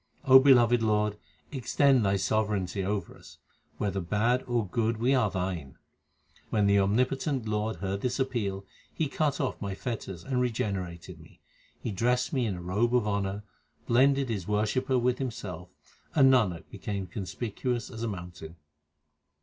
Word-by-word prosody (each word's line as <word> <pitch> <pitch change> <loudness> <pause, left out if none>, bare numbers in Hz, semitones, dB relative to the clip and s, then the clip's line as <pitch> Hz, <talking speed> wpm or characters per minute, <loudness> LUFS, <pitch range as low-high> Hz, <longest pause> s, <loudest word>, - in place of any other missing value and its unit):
O 130 -1 +9
beloved 120 -3 +5
Lord, 105 -1 +1 0.4
extend 135 -1 +3
Thy 100 0 +2
sovereignty 100 -1 0
over 100 -2 -3
us. - - -15 0.4
Whether 100 -2 -1
bad 110 +8 +1
or 120 -3 0
good 115 +3 0
we 120 +4 +2
are 125 -6 +3
Thine. 90 -7 -4 0.7
When 105 -3 +2
the 100 0 +4
omnipotent 125 +5 0
Lord 110 +1 -1
heard 100 0 -3
this 125 0 -1
appeal, 105 -7 -2 0.3
He 160 - -1
cut 145 0 -1
off 130 - -2
my 100 -1 -3
fetters 100 -7 -5
and 125 +1 -1
regenerated 95 -8 -3
me. - - -17 0.4
He 115 - -4
dressed 125 - 0
me 130 -4 +1
in 100 - -2
a 90 - -7
robe 110 +7 +1
of 120 -4 +2
honour, 100 0 -2 0.4
blended 135 +2 +3
His 100 -6 -3
wor 105 0 +1
shipper 130 +4 0
with 125 0 +1
Himself, 95 -9 -5 0.5
and 135 -3 +6
Nanak 95 -10 +1
became 100 -2 -4
conspicuous 110 +6 -4
as 110 - -8
a 115 - -1
mountain. 90 -4 -7
110 Hz, 160 wpm, -28 LUFS, 95-125 Hz, 0.7 s, O